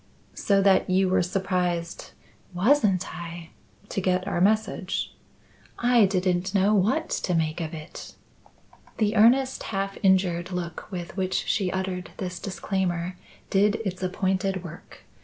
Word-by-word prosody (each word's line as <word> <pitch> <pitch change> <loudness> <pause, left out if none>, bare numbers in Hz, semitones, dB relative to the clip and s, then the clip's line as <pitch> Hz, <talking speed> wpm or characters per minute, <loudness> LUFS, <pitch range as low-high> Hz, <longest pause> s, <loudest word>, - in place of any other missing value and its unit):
"So 195 -1 +2
that 195 -2 +4
you 185 0 +3
were 185 - +3
surprised 180 -2 -2 0.2
" - - -31
"Wasn't 200 -3 +2
I!" 170 -1 -8 0.4
"To 195 - -2
get 185 0 0
our 175 - -1
message." 200 -2 0 0.6
"I 240 -2 +4
didn't 185 0 0
know 200 +2 +4
what 220 - +2
to 180 - 0
make 160 +1 0
of 160 0 -4
it." 155 0 -10 0.8
The 215 0 +1
earnest, 255 +5 +4
half 195 -1 -3
injured 185 -2 +2
look 175 0 -5
with 175 -2 -6
which 185 0 -1
she 190 -4 0
uttered 185 -2 -3
this 180 -1 -5
disclaimer, 185 -3 -2 0.4
did 200 +2 +3
its 185 -1 -3
appointed 190 0 -1
work. 170 - -11
190 Hz, 140 wpm, -26 LUFS, 180-200 Hz, 0.8 s, that